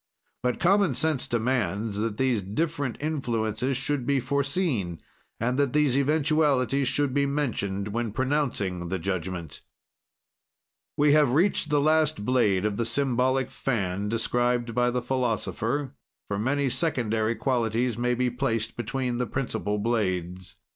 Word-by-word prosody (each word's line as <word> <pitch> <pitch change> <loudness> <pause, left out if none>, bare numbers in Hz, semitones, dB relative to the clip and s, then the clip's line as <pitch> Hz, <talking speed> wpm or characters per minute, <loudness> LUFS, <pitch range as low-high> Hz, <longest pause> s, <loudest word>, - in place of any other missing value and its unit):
"But 125 -1 -1
common 190 -5 +3
sense 155 -3 +1
demands 110 -4 -1
that 110 -1 -2
these 130 -5 +1
different 145 - -2
influences 125 -4 -1
should 135 -2 -1
be 140 -1 +2
foreseen, 135 - -1 0.4
and 125 +4 0
that 140 -3 +1
these 150 -4 +3
eventualities 140 -2 +2
should 135 +1 +1
be 140 0 +2
mentioned 105 -9 -2
when 115 +1 -2
pronouncing 115 - -1
the 95 - -1
judgment." 90 -3 -4 1.4
We 145 0 +4
have 150 -5 +4
reached 165 0 +2
the 145 0 +3
last 155 -6 +2
blade 105 -6 +2
of 105 -1 -1
the 115 - +1
symbolic 130 +1 +1
fan, 100 -5 -2
described 120 +1 0
by 125 +1 +2
the 125 0 -2
philosopher, 130 +2 -1 0.3
for 100 -1 -2
many 140 +5 +1
secondary 120 -6 0
qualities 120 0 0
may 125 +1 0
be 125 0 0
placed 115 -3 -1
between 125 0 -2
the 125 - -1
principle 105 -3 -2
blades. 95 -5 -2
125 Hz, 135 wpm, -26 LUFS, 110-140 Hz, 1.4 s, We